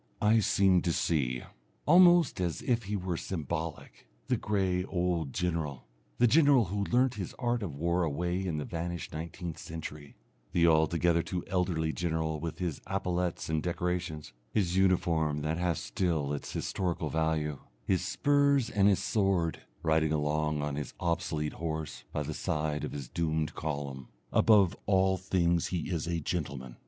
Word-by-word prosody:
I 110 Hz, +2 st, +4 dB
seem 95 Hz, -3 st, +4 dB
to 85 Hz, -, 0 dB
see, 65 Hz, -8 st, 0 dB, 0.4 s
almost 175 Hz, -, +6 dB
as 85 Hz, -3 st, -2 dB
if 120 Hz, -3 st, 0 dB
he 105 Hz, +2 st, -2 dB
were 90 Hz, -3 st, -2 dB
symbolic, 80 Hz, -2 st, -5 dB, 0.2 s
the -, -, +3 dB
grey 95 Hz, -3 st, 0 dB
old 90 Hz, -5 st, -1 dB
general 80 Hz, -7 st, -2 dB, 0.3 s
the -, -, +5 dB
general 140 Hz, -2 st, +5 dB
who 100 Hz, -1 st, 0 dB
learnt 125 Hz, +2 st, +2 dB
his 90 Hz, -, -6 dB
art 120 Hz, -2 st, 0 dB
of 85 Hz, -9 st, -4 dB
war 85 Hz, +4 st, 0 dB
away 85 Hz, +4 st, -1 dB
in 85 Hz, -5 st, -2 dB
the 75 Hz, -, -3 dB
vanished 85 Hz, -1 st, -4 dB
nineteenth 80 Hz, +1 st, -6 dB
century, 75 Hz, -3 st, -8 dB, 0.4 s
the 85 Hz, -1 st, +4 dB
altogether 85 Hz, +1 st, +3 dB
too 90 Hz, +1 st, -4 dB
elderly 85 Hz, -4 st, 0 dB
general 80 Hz, -2 st, -1 dB
with 80 Hz, 0 st, -4 dB
his 85 Hz, -4 st, -3 dB
epaulettes 90 Hz, -2 st, -1 dB
and 80 Hz, -1 st, 0 dB
decorations, 85 Hz, -5 st, -3 dB, 0.2 s
his 90 Hz, -5 st, +1 dB
uniform 85 Hz, -5 st, +2 dB
that 80 Hz, +2 st, -1 dB
has 90 Hz, -3 st, 0 dB
still 80 Hz, -6 st, -1 dB
its 70 Hz, -, -5 dB
historical 85 Hz, -4 st, -2 dB
value, 80 Hz, -2 st, 0 dB, 0.3 s
his 95 Hz, -2 st, +1 dB
spurs 140 Hz, -, +2 dB
and 100 Hz, -1 st, +4 dB
his 100 Hz, -2 st, +3 dB
sword 95 Hz, -6 st, +1 dB, 0.2 s
riding 80 Hz, -1 st, +2 dB
along 75 Hz, 0 st, 0 dB
on 75 Hz, -1 st, -2 dB
his 75 Hz, -, -5 dB
obsolete 80 Hz, -3 st, -1 dB
horse, 80 Hz, -7 st, -4 dB
by 75 Hz, -, -2 dB
the 80 Hz, +2 st, -4 dB
side 75 Hz, -1 st, -2 dB
of -, -, -3 dB
his 70 Hz, -3 st, -6 dB
doomed 80 Hz, -2 st, -1 dB
column. 70 Hz, -4 st, -4 dB, 0.3 s
Above 100 Hz, -5 st, +5 dB
all 95 Hz, -1 st, +3 dB
things 85 Hz, -2 st, +1 dB
he 90 Hz, 0 st, -3 dB
is 85 Hz, -2 st, -2 dB
a 85 Hz, -1 st, -1 dB
gentleman. 70 Hz, -6 st, -4 dB
85 Hz, 160 wpm, -30 LUFS, 80-95 Hz, 0.4 s, almost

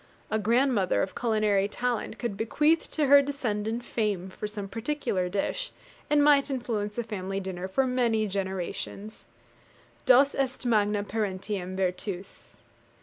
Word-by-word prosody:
A 220 Hz, -, +1 dB
grandmother 230 Hz, -3 st, +2 dB
of 190 Hz, -, -4 dB
culinary 215 Hz, -4 st, +1 dB
talent 235 Hz, +1 st, -2 dB
could 235 Hz, -4 st, -3 dB
bequeath 300 Hz, +10 st, +1 dB
to 305 Hz, -, 0 dB
her 280 Hz, +1 st, +8 dB
descendant 235 Hz, -5 st, -2 dB
fame 200 Hz, -5 st, -2 dB
for 210 Hz, -, -5 dB
some 210 Hz, -1 st, -6 dB
particular 225 Hz, -5 st, -2 dB
dish, 350 Hz, -, -2 dB, 0.4 s
and 295 Hz, 0 st, +4 dB
might 290 Hz, -1 st, +5 dB
influence 225 Hz, -6 st, -2 dB
the 240 Hz, -, -1 dB
family 195 Hz, -3 st, -4 dB
dinner 185 Hz, -1 st, -5 dB
for 260 Hz, +8 st, +1 dB
many 240 Hz, -4 st, +1 dB
generations. 195 Hz, +2 st, -4 dB, 0.8 s
Dos 270 Hz, +3 st, +6 dB
est 265 Hz, -1 st, -2 dB
magna 210 Hz, -2 st, +2 dB
parentium 195 Hz, -3 st, -3 dB
Virtus. 190 Hz, +1 st, -4 dB
215 Hz, 135 wpm, -28 LUFS, 195-250 Hz, 0.8 s, her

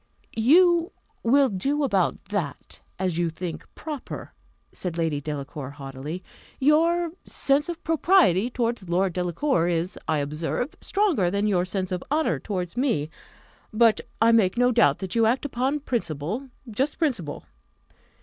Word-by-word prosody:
"You 340 Hz, -, +4 dB, 0.3 s
will 270 Hz, +3 st, +4 dB
do 275 Hz, +10 st, 0 dB
about 195 Hz, -9 st, +1 dB
that 170 Hz, -10 st, -4 dB, 0.2 s
as 180 Hz, -3 st, -1 dB
you 170 Hz, -1 st, +1 dB
think 165 Hz, +1 st, -6 dB
proper," 300 Hz, -4 st, -7 dB, 0.4 s
said 175 Hz, -3 st, -5 dB
Lady 160 Hz, -3 st, 0 dB
Delacour 145 Hz, -1 st, -5 dB
haughtily. 140 Hz, +5 st, -7 dB, 0.4 s
"Your 330 Hz, +4 st, +3 dB
sense 285 Hz, +3 st, +1 dB
of 345 Hz, 0 st, -5 dB
propriety 320 Hz, -, +3 dB
towards 235 Hz, -6 st, -2 dB
Lord 180 Hz, +1 st, +1 dB
Delacour 180 Hz, -, 0 dB
is, 175 Hz, +1 st, -1 dB
I 155 Hz, -, +1 dB
observe, 155 Hz, -, -2 dB
stronger 375 Hz, -, +1 dB
than 200 Hz, +3 st, 0 dB
your 185 Hz, -4 st, +2 dB
sense 185 Hz, 0 st, -3 dB
of 180 Hz, -1 st, -2 dB
honour 305 Hz, +2 st, +1 dB
towards 180 Hz, -3 st, -4 dB
me. 230 Hz, -, 0 dB, 0.6 s
But 225 Hz, 0 st, +4 dB, 0.2 s
I 225 Hz, +1 st, +5 dB
make 215 Hz, -3 st, +3 dB
no 245 Hz, +1 st, +4 dB
doubt 220 Hz, -, +4 dB
that 180 Hz, -, -6 dB
you 230 Hz, -1 st, +4 dB
act 250 Hz, +5 st, +1 dB
upon 270 Hz, +2 st, -1 dB
principle 220 Hz, -, -3 dB, 0.2 s
just 260 Hz, +6 st, -1 dB
principle. 230 Hz, -, -2 dB
210 Hz, 140 wpm, -25 LUFS, 170-275 Hz, 0.6 s, I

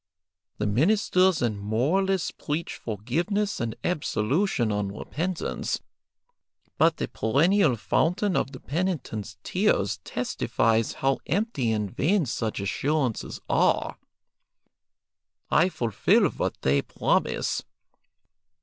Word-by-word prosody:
The 105 Hz, -, -1 dB
ministers 185 Hz, -, +3 dB
and 110 Hz, -4 st, 0 dB
moralists 165 Hz, -, +1 dB
preach 155 Hz, +3 st, -4 dB
forgiveness 165 Hz, -, -2 dB
and 115 Hz, -1 st, -2 dB
absolution 145 Hz, -, 0 dB
on 105 Hz, -1 st, -1 dB
repentance, 165 Hz, -, -3 dB, 1.0 s
but 165 Hz, +1 st, +4 dB
the -, -, -2 dB
perennial 155 Hz, -, +3 dB
fountain 180 Hz, -, +1 dB
of 135 Hz, -, 0 dB
the 130 Hz, -, -9 dB
penitent's 135 Hz, -, -3 dB
tears 110 Hz, -, +1 dB
testifies 115 Hz, 0 st, 0 dB
how 135 Hz, 0 st, +3 dB
empty 160 Hz, -, 0 dB
and 105 Hz, -3 st, -2 dB
vain 185 Hz, +1 st, +2 dB
such 115 Hz, -3 st, -2 dB
assurances 130 Hz, +5 st, -1 dB
are. -, -, +1 dB, 1.5 s
I 180 Hz, -, +4 dB
fulfil 115 Hz, -, +2 dB
what -, -, -3 dB
they 70 Hz, +1 st, +3 dB
promise. -, -, 0 dB
140 Hz, 100 wpm, -26 LUFS, 110-180 Hz, 1.5 s, but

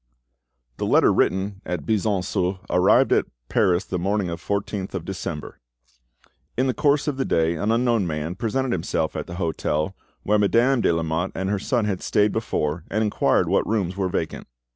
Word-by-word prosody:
The -, -, -2 dB
letter -, -, +5 dB
written 95 Hz, +1 st, 0 dB
at 90 Hz, -5 st, -4 dB
Buisson 105 Hz, -3 st, +1 dB
Souef 95 Hz, 0 st, -1 dB
arrived -, -, +4 dB
at -, -, +2 dB, 0.2 s
Paris 90 Hz, 0 st, +2 dB
the 90 Hz, -, -3 dB
morning 95 Hz, 0 st, 0 dB
of 85 Hz, -, -5 dB
the -, -, -20 dB
14th 100 Hz, -1 st, -2 dB
of -, -, -4 dB
December. 85 Hz, -5 st, -6 dB, 1.0 s
In 130 Hz, -, +2 dB
the 130 Hz, -, +1 dB
course 145 Hz, +2 st, +2 dB
of 145 Hz, -3 st, -1 dB
the 135 Hz, -, +1 dB
day 80 Hz, +1 st, +1 dB
an 100 Hz, +7 st, -1 dB
unknown 115 Hz, -4 st, +2 dB
man 75 Hz, +1 st, -3 dB
presented 120 Hz, +6 st, -1 dB
himself 85 Hz, -7 st, -1 dB
at -, -, -4 dB
the 85 Hz, -, -7 dB
hotel 85 Hz, 0 st, -1 dB, 0.3 s
where 105 Hz, +1 st, +2 dB
Madame 120 Hz, +5 st, +3 dB
de -, -, +3 dB
Lamotte 80 Hz, +2 st, -1 dB
and 95 Hz, +1 st, -2 dB
her 105 Hz, -, 0 dB
son 120 Hz, +2 st, 0 dB
had 100 Hz, -3 st, -2 dB
stayed 105 Hz, 0 st, +2 dB
before, 85 Hz, -7 st, -2 dB
and 110 Hz, +2 st, 0 dB
inquired 105 Hz, -, +2 dB
what -, -, +1 dB
rooms 95 Hz, -5 st, 0 dB
were 95 Hz, -2 st, -1 dB
vacant. -, -, -3 dB
95 Hz, 185 wpm, -23 LUFS, 85-110 Hz, 1.0 s, letter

